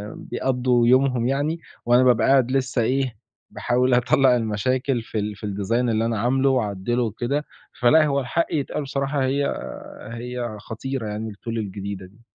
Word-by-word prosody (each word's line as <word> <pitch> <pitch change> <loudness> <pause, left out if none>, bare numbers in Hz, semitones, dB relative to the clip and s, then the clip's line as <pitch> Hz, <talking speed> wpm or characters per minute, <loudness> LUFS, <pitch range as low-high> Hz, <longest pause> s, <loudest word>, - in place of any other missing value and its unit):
بيقضّوا 125 -1 0
يومهم 125 -1 +3
يعني 145 +5 0 0.3
وأنا 120 +1 +5
بابقى 125 -2 +4
قاعد 130 -2 +4
لسّه 130 -2 0
إيه، 130 +1 0 0.3
باحاول 125 +1 +1
أطلّع 125 +1 +4
المشاكل 125 +3 0
في 110 -1 -4
ال 105 0 -3
في 105 - -8
الdesign 100 +1 -3 0.2
اللي 110 0 +1
أنا 115 -3 -1
عامله 130 +4 +2
وأعدّله 120 -1 0
وكده، 120 +6 -2 0.4
فلأ 155 +6 +6
هو 140 -1 +1
الحق 140 +6 0
يتقال 150 0 -2
بصراحة 140 0 -1
هي 140 +2 +1 0.7
هي 120 -1 -5
خطيرة 115 +2 -5
يعني 105 +1 -4
الTool 100 - -21
الجديدة 100 -2 -5
دي. 105 +5 -20
125 Hz, 155 wpm, -23 LUFS, 110-135 Hz, 0.7 s, فلأ